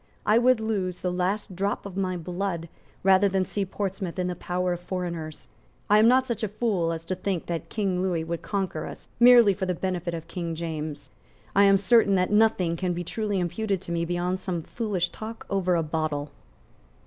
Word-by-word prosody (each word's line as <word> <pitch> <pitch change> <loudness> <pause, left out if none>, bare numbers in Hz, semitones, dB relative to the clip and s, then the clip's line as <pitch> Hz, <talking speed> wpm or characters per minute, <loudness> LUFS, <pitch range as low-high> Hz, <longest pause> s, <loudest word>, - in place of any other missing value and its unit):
I 215 +2 +5
would 250 0 +4
lose 195 -5 -2
the 180 - -1
last 185 +2 -1
drop 200 +3 -1
of 195 -2 -7
my 185 -2 -1
blood 175 0 -3 0.4
rather 195 +1 +5
than 190 -1 +1
see 200 +1 -2
Portsmouth 190 -2 -4
in 180 - 0
the 180 0 -2
power 180 0 -1
of 175 - -5
foreigners. 170 -4 -5 0.4
I 210 - +7
am 220 - +6
not 255 +2 +5
such 235 -4 -3
a 215 - 0
fool 200 -5 0
as 165 0 -5
to 185 - -2
think 185 -2 -2
that 170 -1 -4
King 195 -4 -1
Lewis 175 -4 0
will 170 0 -3
conquer 190 -5 -3
us - - -10
merely 240 -4 +8
for 190 0 -3
the 180 - 0
benefit 175 -1 -2
of 165 -1 -7
King 170 -3 -4
James. 155 -3 -5 0.4
I 200 +1 +6
am 195 0 +6
certain 200 0 +4
that 185 +1 +1
nothing 210 -6 +3
can 180 -1 -1
be 175 +1 -3
truly 205 +1 -2
imputed 195 +3 -1
to 175 - -8
me 170 0 0
beyond 175 +2 -1
some 180 -3 -3
foolish 195 -6 -2
talk 225 +1 -8
over 185 -2 +2
a 165 - +1
bottle." 155 -2 -2
185 Hz, 205 wpm, -26 LUFS, 170-200 Hz, 0.4 s, merely